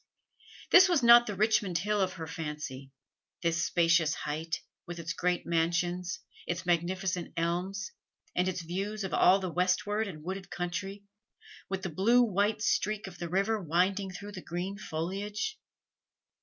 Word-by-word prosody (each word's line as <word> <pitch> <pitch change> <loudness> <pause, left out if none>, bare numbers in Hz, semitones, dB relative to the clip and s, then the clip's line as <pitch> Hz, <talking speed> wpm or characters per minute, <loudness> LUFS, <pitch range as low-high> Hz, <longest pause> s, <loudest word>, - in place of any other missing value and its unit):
This 370 +1 +8
was 330 -8 +2
not 235 0 +8
the 205 - -3
Richmond 205 -3 +2
Hill 205 +3 0
of 185 -1 0
her 165 -3 -6
fancy 150 -4 -6 0.5
this 170 +1 +1
spacious 170 -2 +3
height; 160 +2 -3 0.3
with 175 0 -6
its 170 0 -4
great 180 -1 0
mansions, 175 +2 0 0.3
its 175 +1 -3
magnificent 180 +1 0
elms, 180 - -2 0.4
and 180 +1 +2
its 180 -2 -2
view 190 +5 -3
of 190 - -4
all 185 - +6
the 185 -2 -4
westward 205 +4 +1
and 155 -6 -8
wooded 190 +2 -5
country, 185 +3 -4 0.7
with 190 -1 -3
the 190 - -2
blue 225 +9 +4
white 210 0 +1
streak 215 0 0
of 185 -2 -10
the 170 - -4
river 200 +4 +1
winding 185 +4 +1
through 200 +3 -8
the 190 -2 -8
green 180 +4 -4
foliage. 200 - -4
185 Hz, 155 wpm, -30 LUFS, 170-200 Hz, 0.7 s, This